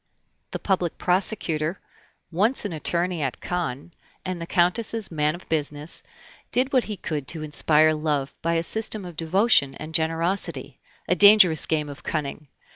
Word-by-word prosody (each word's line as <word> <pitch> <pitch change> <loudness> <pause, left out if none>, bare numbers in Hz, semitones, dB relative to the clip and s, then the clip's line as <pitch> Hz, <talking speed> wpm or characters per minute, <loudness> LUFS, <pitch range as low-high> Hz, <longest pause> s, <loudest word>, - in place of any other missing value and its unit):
The - - -4
public 180 -4 -1
prosecutor, 180 -3 0 0.5
once 210 +9 +2
an 200 - -3
attorney 170 +2 -1
at 135 -3 -3
Caen, 170 -4 -4 0.3
and 185 -2 -4
the 170 - -5
Countess's 210 +5 +1
man 150 0 0
of 175 - -13
business, 150 0 -3 0.5
did 260 +2 +1
what 255 -2 +3
he 210 -2 -5
could 150 -7 -4
to 160 +1 -3
inspire 155 +1 +3
love 150 -3 -2
by 165 0 0
a 165 - +1
system 215 +1 -3
of 175 -2 -9
devotion 165 - +2
and 155 +1 -8
generosity, 165 -3 -1 0.3
a - - +3
dangerous 190 -3 +6
game 150 -2 0
of 145 -1 -9
cunning! 150 -1 -4
165 Hz, 155 wpm, -24 LUFS, 155-185 Hz, 0.5 s, dangerous